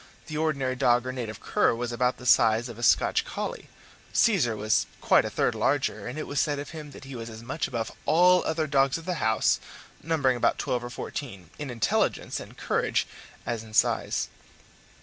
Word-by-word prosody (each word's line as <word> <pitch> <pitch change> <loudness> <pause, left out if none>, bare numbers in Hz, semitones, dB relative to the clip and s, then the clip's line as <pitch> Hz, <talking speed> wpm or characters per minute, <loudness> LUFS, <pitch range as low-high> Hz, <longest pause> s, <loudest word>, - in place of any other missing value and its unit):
The 155 - -7
ordinary 140 -5 0
dog 120 -1 +3
or 130 - -2
native 115 -5 -5
cur - - +2
was 120 +1 -3
about 125 +1 0
the 125 - -11
size 115 -1 +4
of 115 -1 -9
a - - -7
Scotch 120 - +3
collie; - - -5 0.4
Caesar 165 - +3
was 110 +1 +1
quite - - +4
a - - -2
third - - +1
larger, 140 -3 0
and 125 +5 -5
it 155 - -3
was 145 - -2
said 145 -1 +1
of 145 - -6
him 155 -3 -8
that 140 - -12
he 135 -1 -8
was 115 -1 -6
as 110 0 -10
much 140 +6 -2
above 115 -2 -3 0.2
all 180 +2 +5
other 160 0 0
dogs 140 -1 +2
of 165 - -10
the 180 -3 -2
house, 110 0 +2 0.4
numbering 140 -5 +1
about - - +2
twelve 125 -1 -1
or 120 - -5
fourteen, 120 -6 -7
in 145 -2 -4
intelligence 115 -3 0
and - - -11
courage - - 0 0.4
as 120 -2 -2
in 110 -1 -11
size. - - +2
130 Hz, 200 wpm, -27 LUFS, 115-150 Hz, 0.4 s, all